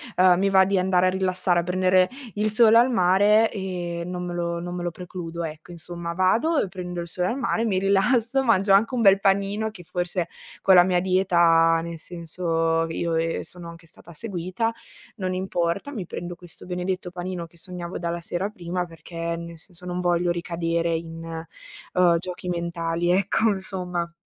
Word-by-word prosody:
ehm, 180 -1 +5
mi 195 +1 +2
va 190 -1 +6
di 195 +1 +1
andare 185 0 +3
a - - +4
rilassare, 185 -1 +1
a - - -7
prendere 185 +1 +3 0.3
il 215 +1 0
sole 225 +1 +6
al 245 +2 +5
mare, 205 +2 +4
ehm, 175 -4 -4
non 180 0 -4
me 175 - -4
lo 170 0 -2
non 175 +1 -5
me 175 - -4
lo 175 - -2
precludo 170 -1 -6
ecco. 160 +2 -7
Insomma, 170 0 -6
vado 225 - +2
e - - -1
prendo 180 -1 -5
il 170 - -6
sole 180 +1 -2
al 255 - -2
mare, 235 -2 0
mi 195 -4 +1
rilasso, 225 +7 +2
mangio 200 -5 +3
anche 220 +6 +4
un 245 - 0
bel 195 -2 +6
panino 200 +2 +1
che 195 - -12
forse, 175 +1 -2 0.3
con 190 - +6
la 175 - +9
mia 180 -1 +2
dieta 170 -3 +4
nel 170 0 -6
senso 165 -1 -1
io, 165 0 -1
ehm, 165 0 0
sono 175 -1 -9
anche 165 0 -13
stata 170 - -16
seguita, 185 +4 -3 0.4
non 185 -3 -3
importa, 185 +5 -2
mi 215 -10 -5
prendo 175 +1 -6
questo 175 0 -13
benedetto 180 0 -3
panino 175 -1 -5
che 170 - -22
sognavo 175 0 -6
dalla 170 0 -3
sera 180 +4 -3
prima 180 -2 -4
perché, 170 0 -5
nel 170 0 -8
senso, 180 +2 -12
non 180 0 -3
voglio 175 -1 +1
ricadere 170 -1 -1
in, 165 0 -5 0.7
uhm, 175 -2 +4
giochi 180 +1 -6
mentali 170 0 -1
ecco 200 +4 +2
insomma. 180 -3 -3
180 Hz, 185 wpm, -24 LUFS, 170-190 Hz, 0.7 s, la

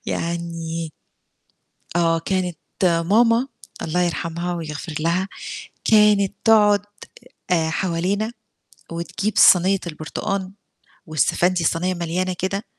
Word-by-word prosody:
يعني 165 -1 -3 1.0
آه، 165 -1 +3
كانت 180 0 -2 0.2
ماما 220 +9 +3 0.3
الله 165 +2 -1
يرحمها، 170 0 -2
ويغفر 155 -1 -6
لها، 170 +4 0 0.6
كانت 210 -2 +4
تقعُد 210 -3 +5 0.7
آآ 165 -2 +2
حوالينا، 190 +6 -1 0.6
وتجيب 170 +5 -3
صينيّة 190 +2 +6
البرتقان، 185 +5 -4 0.5
والسَفَندي، 175 +3 +1
الصينيّة 175 +3 +1
مليانة 175 +2 -2
كده 195 +3 -2
175 Hz, 90 wpm, -22 LUFS, 165-195 Hz, 1.0 s, صينيّة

